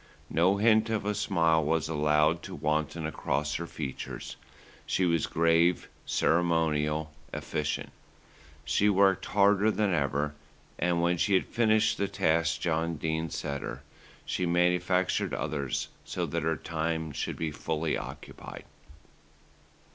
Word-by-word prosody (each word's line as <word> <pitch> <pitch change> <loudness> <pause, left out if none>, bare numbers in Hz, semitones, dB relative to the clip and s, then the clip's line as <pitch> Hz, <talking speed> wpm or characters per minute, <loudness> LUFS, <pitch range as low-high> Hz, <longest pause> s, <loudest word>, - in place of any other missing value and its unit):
No 90 +4 +3
hint 110 +1 +4
of 110 -3 -1
a 105 - +1
smile 85 -6 +2
was 80 +1 0
allowed 75 +1 +2
to - - -8
wanton 75 +1 -1
across 75 -1 -2
her 85 - -3
features, 70 -6 -6 0.5
she 95 - 0
was 85 -3 +1
grave, 85 +1 +2 0.2
ceremonial, 80 -2 +1 0.2
efficient. 75 0 -3 0.7
She 75 +9 +3
worked 95 -1 +3
harder 100 +1 +4
than 105 -2 +1
ever 75 -1 0 0.5
and, 85 -1 +1
when 85 0 +1
she 100 +2 +3
had 95 - +2
finished 110 -2 +2
the 100 - +1
tasks 85 -3 +1
John 85 0 -1
Dene 80 +1 -2
set 70 -1 -4
her, - - -6 0.4
she 90 - -1
manufactured 90 +1 +1
others 70 -4 -2
so - - -3
that - - -2
her 80 0 0
time 80 -1 -2
should - - -4
be 80 -2 -2
fully 80 +2 -2
occupied. - - -8
80 Hz, 130 wpm, -29 LUFS, 75-90 Hz, 0.7 s, hint